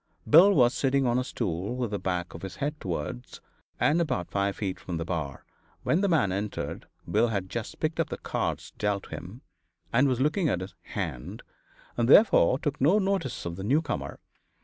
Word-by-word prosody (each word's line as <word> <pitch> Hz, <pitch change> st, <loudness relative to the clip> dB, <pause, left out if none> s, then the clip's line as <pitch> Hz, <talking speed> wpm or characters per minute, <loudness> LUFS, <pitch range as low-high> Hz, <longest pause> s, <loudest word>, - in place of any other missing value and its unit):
Bill 175 Hz, +7 st, +8 dB
was 125 Hz, -8 st, +4 dB
sitting 135 Hz, 0 st, +1 dB
on 120 Hz, 0 st, +2 dB
a -, -, 0 dB
stool 100 Hz, -2 st, -3 dB
with 125 Hz, -4 st, -2 dB
the 100 Hz, -, -2 dB
back 90 Hz, -2 st, -2 dB
of 80 Hz, -, -9 dB
his 95 Hz, -2 st, -7 dB
head 150 Hz, +2 st, -3 dB
towards 75 Hz, -8 st, -5 dB, 0.4 s
and 165 Hz, +4 st, +3 dB
about 95 Hz, -, -2 dB
five 100 Hz, 0 st, 0 dB
feet 95 Hz, -3 st, -3 dB
from 85 Hz, -, -5 dB
the 80 Hz, -, -3 dB
bar. 80 Hz, -6 st, -4 dB, 0.4 s
When 165 Hz, -, +2 dB
the 200 Hz, -, +2 dB
man 150 Hz, -, +3 dB
entered, 100 Hz, +2 st, -4 dB, 0.2 s
Bill 110 Hz, +3 st, +3 dB
had 100 Hz, -4 st, -3 dB
just 115 Hz, -3 st, -5 dB
picked 155 Hz, +1 st, -1 dB
up -, -, +1 dB
the -, -, -4 dB
cards -, -, -3 dB
dealt 100 Hz, -1 st, -1 dB
him, 95 Hz, +9 st, -8 dB, 0.5 s
and 130 Hz, +4 st, +4 dB
was 125 Hz, -2 st, 0 dB
looking 155 Hz, +5 st, +2 dB
at 90 Hz, -, 0 dB
his 95 Hz, 0 st, -7 dB, 0.2 s
"hand," 85 Hz, -, -4 dB, 0.5 s
and 120 Hz, 0 st, +1 dB
therefore 140 Hz, -, +6 dB
took 145 Hz, -2 st, -3 dB
no 165 Hz, +10 st, +5 dB
notice 190 Hz, -, -1 dB
of 85 Hz, 0 st, -4 dB
the 95 Hz, -, -5 dB
newcomer. 145 Hz, +8 st, -1 dB
115 Hz, 195 wpm, -27 LUFS, 95-145 Hz, 0.5 s, Bill